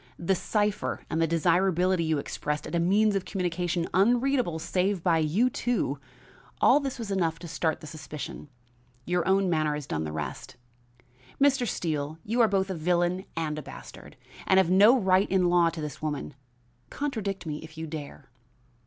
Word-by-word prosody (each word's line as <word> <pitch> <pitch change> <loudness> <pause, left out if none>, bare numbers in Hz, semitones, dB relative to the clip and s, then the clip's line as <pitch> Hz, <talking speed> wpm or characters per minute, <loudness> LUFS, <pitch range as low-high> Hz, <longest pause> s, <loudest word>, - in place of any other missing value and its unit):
The 175 +3 +1
cipher 205 +2 -1
and 160 0 0
the 165 - +3
desirability 180 +2 +2
you 160 -1 +1
expressed 150 +1 -3
of - - -7
a 170 - +2
means 200 +4 +3
of 195 - 0
communication 175 -2 -2
unreadable 240 - +2
save 180 +2 -1
by 170 -3 +3
you 165 +11 +2
two, 245 -1 -1 0.6
all - - +6
this 275 -3 -4
was 225 -4 -5
enough 170 -4 0
to 170 - -9
start 160 -1 -1
the - - -9
suspicion; 150 -1 -8 0.6
your 175 -1 0
own 190 0 +3
manner 155 -3 +1
has 150 -1 -5
done 80 - -3
the 75 - -4
rest. 80 - -6 0.8
Mr. 275 -3 +3
Steele, 155 -5 -2
you 235 +4 +1
are 230 - +6
both 195 -2 0
a - - -1
villain 175 +3 0
and 155 -2 -2
a - - -5
bastard, - - -12 0.3
and 190 - +4
have 185 -2 +4
no 210 +7 +7
right 190 -3 +3
in 185 -2 +3
law 175 -1 +4
to 165 -1 -7
this 150 -3 -6
woman. 150 -1 -3 0.6
Contradict 210 -10 -3
me 150 -2 -3
if 160 0 -12
you 160 - -4
dare." 150 - -8
175 Hz, 180 wpm, -27 LUFS, 160-195 Hz, 0.8 s, no